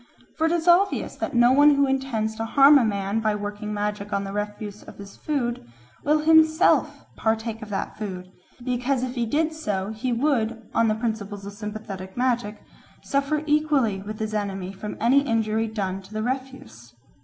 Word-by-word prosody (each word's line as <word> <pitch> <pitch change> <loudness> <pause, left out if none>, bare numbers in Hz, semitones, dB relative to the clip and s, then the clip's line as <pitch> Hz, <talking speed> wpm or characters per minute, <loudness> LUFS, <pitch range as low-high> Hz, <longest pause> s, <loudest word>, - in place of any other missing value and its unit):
For 320 0 +1
it - - 0
is 340 0 -1
obvious 370 +3 +3
that - - -4
no 240 +1 +6
one 290 +2 +6
who 280 0 +3
intends 265 -5 -1
to 225 - -2
harm 280 +4 +7
a - - +2
man 200 0 -1
by 215 -1 0
working 205 +1 -5
magic 210 0 -3
on 200 -1 0
the 195 0 -6
refuse 210 0 -5
of - - -13
his 200 -1 -11
food 245 - -2 0.4
will 300 +1 +2
himself 315 +2 +4
partake 220 0 -1
of 215 - -8
that 200 - -4
food, 185 -3 -6 0.3
because 250 +1 0
if 255 -1 -3
he 240 -3 -1
did 315 +6 0
so 205 -10 -3
he 220 +3 -3
would, 235 -3 0
on 230 - +3
the 215 - +2
principles 215 -3 -4
of 200 - -7
sympathetic 205 -2 -7
magic, 240 -4 -1 0.4
suffer 280 +2 0
equally 295 -10 +1
with 210 +2 -7
his 215 -1 -4
enemy 195 -3 -3
from 200 +2 -7
any 250 +5 +4
injury 225 -3 0
done 195 -3 -3
to 190 +2 -15
the 215 - -1
refuse. 245 - -6
220 Hz, 185 wpm, -24 LUFS, 205-270 Hz, 0.4 s, harm